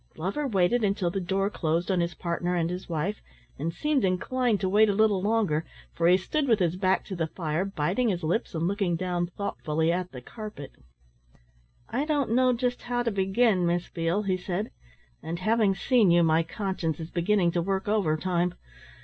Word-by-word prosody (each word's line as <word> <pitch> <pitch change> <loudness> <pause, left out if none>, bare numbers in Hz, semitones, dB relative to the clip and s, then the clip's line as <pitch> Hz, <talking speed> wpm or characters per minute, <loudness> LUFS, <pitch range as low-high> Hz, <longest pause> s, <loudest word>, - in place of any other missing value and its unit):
Glover 195 - -2
waited 210 +2 +2
until 195 -3 +1
the 195 - -2
door 195 +3 0
closed 170 +1 -1
on 185 - +1
his 170 0 -1
partner 175 0 -2
and 170 0 0
his 180 +1 -6
wife 170 +6 -2 0.4
and 160 +4 -1
seemed 290 - 0
inclined 215 +5 +1
to 190 - +1
wait 210 +3 +4
a 200 - +1
little 210 -2 +3
longer, 200 -7 +1 0.3
for 170 - +1
he 180 +1 +6
stood 280 +10 -1
with 225 -3 +4
his 175 -3 +1
back 190 0 +1
to 190 - -5
the 165 -2 -1
fire, 160 +1 -2
biting 195 +6 0
his 180 -4 -2
lips 175 +5 -1
and 165 +1 0
looking 195 -3 0
down 175 0 -1
thoughtfully 160 -4 -1
at 180 +1 -2
the 125 - -8
carpet. 210 - -9 1.2
"I 270 +5 -1
don't 255 -4 +2
just 245 0 -1
know - - -16
how 245 0 0
to 230 - 0
begin, 195 -1 +2
Miss 175 0 -1
Beale," 170 +5 -1
he 190 -2 0
said. 185 +3 -3 0.5
"And 165 +1 -4
having 215 +1 +2
seen 235 -2 +3
you, 170 0 +5
my 160 0 +4
conscience 170 -3 -3
is 160 +1 -7
beginning 175 0 +2
to 170 - 0
work 190 +2 -2
overtime. 180 -3 0
185 Hz, 190 wpm, -27 LUFS, 170-215 Hz, 1.2 s, he